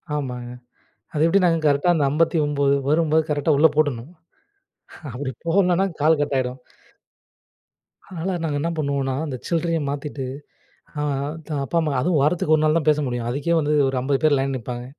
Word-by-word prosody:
ஆமாங்க. 125 -4 -4 0.6
அது 150 +1 +2
எப்படினா 180 0 +3 0.2
கரெக்ட்டா 145 +4 +3
அந்த 145 -3 +2
59 145 -3 +1 0.2
வரும்போது, 160 0 +2
கரெக்ட்டா 150 +1 +1
உள்ளே 160 +2 +6
போட்டுருணும். 145 -2 0 1.0
அப்படி 130 +1 -4 0.2
போடலனா 180 +1 +3 0.2
கால் 155 +1 +4
கட் 145 -1 -1
ஆயிடும். 125 0 -3 1.5
அதனால 185 0 -4
நாங்க 145 -3 -1
என்ன 165 - -1
பண்ணுவோன்னா, 140 -3 -1
அந்த 140 -4 -4
சில்ரைய 165 -1 0
மாத்திட்டு 140 -1 -4 0.8
ஆ - - -1 0.5
த - - -13
அப்பா, 170 - -4
அம்மா 155 -3 -1
அதும் 170 +4 +1
வாரத்துக்கு 155 +1 +2
ஒரு 155 - 0
நாள் 155 +1 +3
தான் 155 - -4
பேச 150 0 +4
முடியும். 120 -1 -3
அதுக்கே 145 +6 -1
வந்து 150 0 -1 0.2
ஒரு 135 - -2
50 135 +1 0
பேர் 155 -2 +4
லைன்ல 135 0 -1
நிப்பாங்க. 120 +1 -6
150 Hz, 160 wpm, -22 LUFS, 135-160 Hz, 1.5 s, உள்ளே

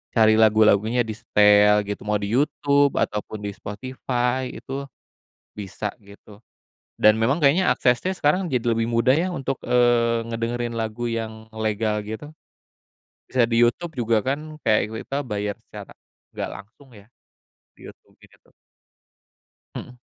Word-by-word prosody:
cari 110 -1 +5
lagu-lagunya 110 +2 +4
disetel 105 -1 +4
gitu 105 - -5
mau 105 - +1
di 100 +1 -4
YouTube 140 0 +2
ataupun 105 0 -3
di - - -3
Spotify 125 +3 -3
itu, 135 +1 -6 0.7
bisa 105 0 -5
gitu, 100 +1 -16 0.6
dan 110 0 +6
memang 135 +9 +1
kayaknya 150 +6 +4
aksesnya 125 +10 +1
sekarang 180 +3 +1
jadi 125 -2 +1
lebih 115 - +1
mudah 125 +4 +3
ya 180 +3 0
untuk, 135 -2 -3
eee, 120 -1 +3
ngedengerin 115 +1 -3
lagu 115 +2 -3
yang 110 -1 -5
legal 110 0 -1
gitu. 110 +7 -7 1.0
Bisa 125 -2 +1
di 115 - +2
YouTube 170 +7 -3
juga 115 -2 +1
kan 135 +2 0 0.3
kayak 110 0 +1
kita 140 +1 -3
bayar 105 -2 -3
secara - - -12 0.4
nggak - - -5
langsung 110 +8 -16
ya, 100 - -15 0.7
di - - -13
YouTube - - -17
gitu. - - -23 1.2
Mhm. 125 0 -9
115 Hz, 135 wpm, -23 LUFS, 105-130 Hz, 1.2 s, dan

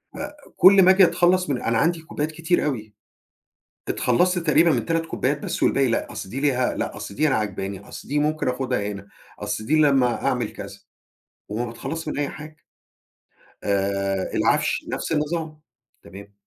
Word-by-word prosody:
آآ 295 +1 -6 0.2
كُل 195 +1 +8
ما 185 - +7
آجي 190 0 +6
أتخلص 180 0 +3
من 130 - -1
أنا 115 0 0
عندي 165 +3 +1
كوبايات 155 -1 -4
كتير 165 +1 0
أوي. 110 -7 -3 1.0
اتخلصت 180 +9 +2
تقريبًا 165 0 +3
من - - +1
3 165 -1 0
كوبايات 140 -2 -1
بس - - -4
والباقي 135 -1 +3
لأ، 115 - -1
أصل - - -6
دي 135 +4 -4
ليها 130 -4 +1
لأ - - -4
أصل 100 - -7
دي 155 +1 +2
أنا 135 - +1
عاجباني، 100 -2 -3
أصل - - -10
دي 145 +1 0
ممكن 150 -2 0
آخُدها 125 -5 -1
هنا، 100 0 -10 0.3
أصل 105 +1 -4
دي 155 +5 +2
لمّا 135 -5 +2
أعمل 120 -4 0
كذا، - - -9 0.7
وما 115 +4 -3
باتخلص 140 +7 -6
من 145 - -3
أي 145 - 0
حاجة. 155 0 -10 1.1
آآ 100 -1 -1
العفش - - +1
نفس - - -4
النظام. 155 0 -2 0.4
تمام. 100 +1 -13
140 Hz, 170 wpm, -23 LUFS, 110-160 Hz, 1.1 s, كُل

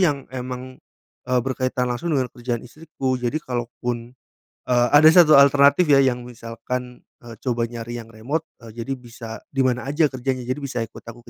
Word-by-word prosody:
yang 145 -7 +2
emang, 130 0 -6 0.5
eee, 125 -1 +3
berkaitan 130 -1 -1
langsung 155 +5 -1
dengan 130 -3 -1
kerjaan 120 -1 -4
istriku. 135 -1 -4
Jadi 125 +4 -1
kalo 120 -2 -3 0.2
pun, 120 -1 -3 0.6
eee, 120 -1 +3
ada 145 +2 +8
satu 165 -3 +7
alternatif 140 +4 +5
ya 140 - +7
yang 125 -2 0
misalkan, 125 +1 -6 0.2
eee, 115 -1 -10
coba 120 -2 0
nyari 120 0 -6
yang 115 - -14
remote, 130 +9 -3 0.2
eee, 115 +1 -8
jadi 135 +3 -3
bisa 120 -1 -10 0.2
di 135 - 0
mana 125 -1 0
aja 150 +2 +3
kerjanya 130 -1 -3
jadi 130 +3 -2
bisa 135 -3 -3
ikut 115 - -10
aku 120 +1 -12
125 Hz, 180 wpm, -22 LUFS, 120-140 Hz, 0.6 s, ada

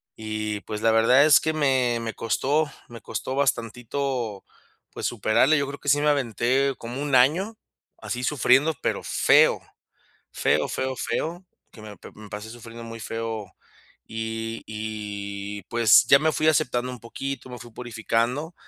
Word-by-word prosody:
y 110 -1 -4
pues 105 0 -6
la 115 - +4
verdad 120 +5 +5
es 150 -2 +6
que 160 - 0
me 130 -6 +1
me 115 -1 -4
costó 145 +6 0 0.2
me 115 -1 -11
costó 115 +5 -4
bastantito, 125 -3 -2 0.5
pues, - - -5
superarla. 120 +6 +3
Yo 140 -1 0
creo 140 +1 -7
que 145 - -3
sí 145 +2 +4
me 150 - +1
aventé 135 0 +1
como 120 +4 -6
1 145 -2 0
año, 170 - +3 0.4
así 125 0 -5
sufriendo, 140 +3 +3
pero - - -1
feo. - - +4 0.7
Feo, - - +1
feo, 130 0 -2
feo, 170 +8 -3 0.3
que 110 - -14
me 105 -1 -9
p - - -12
me 105 -1 -12
pasé 105 +2 -7
sufriendo 115 0 -10
muy 115 0 -8
feo. 110 -3 -5 0.5
Y 115 0 -4
y 105 -2 -5
pues 115 +1 +5
ya 140 - +7
me 160 +2 +2
fui 155 0 0
aceptando 125 -5 +1
un 125 - -8
poquito, 130 +3 -6
me 125 - -7
fui 120 -1 -12
purificando, 120 +6 -2
120 Hz, 160 wpm, -25 LUFS, 110-140 Hz, 0.7 s, ya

